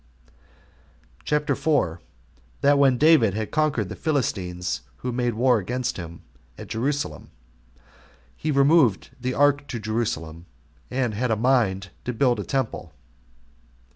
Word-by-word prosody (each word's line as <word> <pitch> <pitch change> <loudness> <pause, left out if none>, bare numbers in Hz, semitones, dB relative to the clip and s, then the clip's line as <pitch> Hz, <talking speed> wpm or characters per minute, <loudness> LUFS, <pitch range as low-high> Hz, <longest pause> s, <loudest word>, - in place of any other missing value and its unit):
CHAPTER 150 0 +1
4. 90 - 0 0.6
That 140 0 +4
When 135 -3 +4
David 135 - +5
Had 110 -1 -3
Conquered 150 -9 +1
The - - -7
Philistines 95 - -2 0.2
Who 125 - 0
Made 120 -1 -1
War 125 0 +3
Against 125 +6 -3
Him 85 -2 -8 0.3
At - - -10
Jerusalem, 140 +6 -3 1.1
He 155 - -4
Removed 140 - +3
The 125 +1 -2
Ark 145 0 +3
To 120 - -5
Jerusalem 90 -7 -3 0.4
And 125 -3 -1
Had 125 +4 -1
A 110 - +2
Mind 105 -6 +1
To 125 - -2
Build 120 -1 +2
A - - -2
Temple. 110 - -3
125 Hz, 130 wpm, -24 LUFS, 100-140 Hz, 1.1 s, David